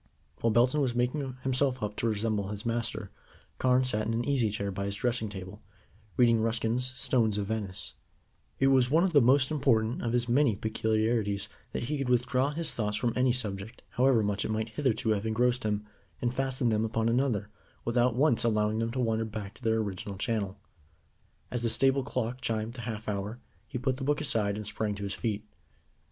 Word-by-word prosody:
While 115 - +2
Belton 120 +6 +3
was 125 -4 0
making 125 +1 -1
himself 130 -1 +1
up 105 0 -3
to 115 - 0
resemble 105 -2 0
his 105 +2 -6
master, 115 0 -2 0.5
Carne 130 0 +4
sat 110 -4 0
in 115 - 0
an 120 - -1
easy 135 -6 +2
chair 100 -1 -2
by 100 +1 -3
his 100 0 -2
dressing 115 0 0
table, 95 -2 -8 0.6
reading 115 -2 +5
Ruskin's 115 +3 0
Stones 110 -6 +1
of 100 - -1
Venice. 100 -3 -4 0.6
It 135 - +4
was 130 -2 +4
one 160 +5 +4
of 190 -2 +1
the 145 - +7
most 130 +3 +4
important 120 -6 +2
of 115 - -1
his 120 -1 +1
many 125 -2 +3
peculiarities 110 -1 0 0.2
that - - -3
he 145 +4 -2
could 135 -2 -1
withdraw 125 +2 +2
his 160 +2 -2
thoughts 105 -2 -1
from 115 +2 0
any 125 0 +3
subject, 105 -3 -3
however 125 -3 +3
much 100 -1 0
it - - -3
might 110 +1 -1
hitherto 115 -1 0
have 105 +1 0
engrossed 120 +3 +2
him, 105 0 -1 0.3
and 120 -1 -1
fasten 130 -1 0
them 110 0 +1
upon 115 0 0
another, 115 -4 +1 0.3
without 120 0 +2
once 135 -2 +3
allowing 110 -1 +1
them 115 0 0
to 125 +2 -4
wander 115 -2 +1
back 105 -2 -6
to 120 - -16
their 110 -1 +2
original 100 -2 -3
channel. 100 -2 -2 0.9
As 120 - -1
the 120 - +1
stable 135 +3 +4
clock 125 -2 -3
chimed 110 -1 -1
the 125 - -7
half 110 -2 -5
hour, 105 +3 -3 0.3
he - - -4
put 130 +1 -1
the 135 - -5
book 145 +2 +1
aside, 105 -8 0
and 105 - -5
sprang 105 0 -1
to 100 - -6
his 100 0 -2
feet. 110 -2 -3
115 Hz, 200 wpm, -29 LUFS, 105-125 Hz, 0.9 s, the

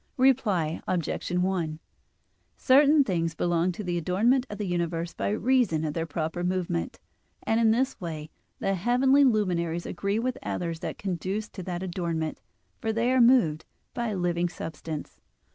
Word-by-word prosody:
Reply 215 -12 +2
Obj. 175 -1 -2
1: 180 -3 0 0.8
Certain 285 +2 +5
things 165 -7 -1
belong 175 +1 +1
to 210 - -6
the 175 -2 -1
adornment 230 - +2
of 205 - -6
the 210 - -3
universe 170 -1 -2
by - - -2
reason 215 -7 +2
of 150 - -2
their 165 0 -2
proper 160 +2 -3
movement; 180 - -2 0.4
and 225 - +1
in 230 -1 +4
this 255 +3 +1
way 155 -3 -6 0.3
the 195 - 0
heavenly 250 +8 +3
luminaries 175 -8 +1
agree 200 +1 -2
with 250 +2 -2
others 170 -2 -3
that - - -5
conduce 195 +3 -3
to 190 - -8
that 180 0 -4
adornment, 170 -3 -3 0.4
for 225 - -1
they 230 +3 +1
are 260 -1 +4
moved 230 -11 +4 0.3
by 240 -1 -2
a 210 -3 -2
living 175 -1 0
substance. 160 -2 -7
180 Hz, 160 wpm, -27 LUFS, 170-230 Hz, 0.8 s, Certain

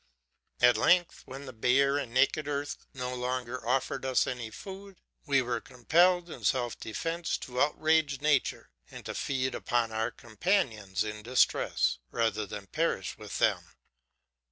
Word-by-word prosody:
"'At 125 0 +6
length, 175 -1 +3
when 135 +2 -8
the 130 - -8
bare 135 +5 +3
and 130 -5 -5
naked 140 +4 +2
earth 145 0 -4
no 125 -1 -4
longer 125 -1 -3
offered 130 +1 0
us 130 -1 +2
any 120 -3 -4
food, 195 - -10 0.3
we 135 -2 +3
were 120 -1 -2
compelled 170 +9 +3
in 165 - -9
self 120 -3 0
defence 165 +9 -2
to 125 0 -4
outrage 150 -1 +2
nature, 145 - +1 0.2
and - - -10
to - - -4
feed 130 -1 -1
upon 120 -2 0
our 110 +1 0
companions 110 - -1
in 105 0 -5
distress, 120 - +2
rather 110 - 0
than 100 0 -7
perish 125 - -1
with - - -6
them. - - +1
130 Hz, 150 wpm, -30 LUFS, 115-145 Hz, 0.3 s, At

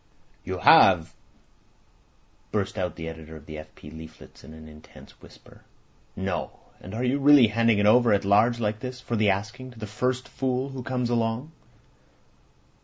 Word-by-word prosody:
"You - - -4
have!" 90 -4 +5 1.4
burst 100 -2 -2
out 90 -3 -3
the 80 -1 -7
editor 80 -1 -9
of 75 -2 -13
the 75 -1 -8
F. 75 0 -13
P. 75 - -13
leaflets 80 0 -13
in - - -13
an 80 0 -12
intense 75 0 -16
whisper. - - -18 0.5
"No! 95 -1 -3 0.3
And 95 +4 -10
are 120 - -3
you 130 +3 0
really 140 -4 +6
handing 115 0 +2
it 105 - +1
over 120 +2 +5
at 100 -1 +1
large 110 +4 +3
like 105 -1 -2
this, 125 +1 -7
for 120 - -4
the 105 -2 +2
asking, 110 +7 -3
to - - -18
the 110 - -6
first 125 +5 -2
fool 130 0 -2
that 130 -2 -8
comes 125 -2 -2
along?" 115 +5 -1
110 Hz, 175 wpm, -25 LUFS, 90-125 Hz, 1.4 s, really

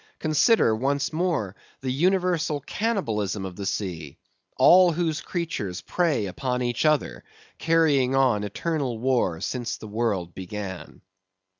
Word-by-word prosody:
Consider, 155 - +3
once 140 +6 -1
more, 155 - -1 0.3
the 130 -1 -2
universal 175 0 +1
cannibalism 110 - -2
of 95 -1 -7
the 100 0 -5
sea; 80 -7 -4 0.4
all 175 +6 +6
whose 160 -2 -1
creatures 105 - -4
prey 150 - 0
upon 125 +6 -2
each 120 +3 -1
other, 155 -1 +1 0.4
carrying 150 -6 +3
on 130 -6 +3
eternal 130 - -2
war 120 -9 0
since 120 -3 -3
the 110 - -10
world 105 -6 -2
began. 95 0 -7
130 Hz, 125 wpm, -25 LUFS, 105-160 Hz, 0.4 s, all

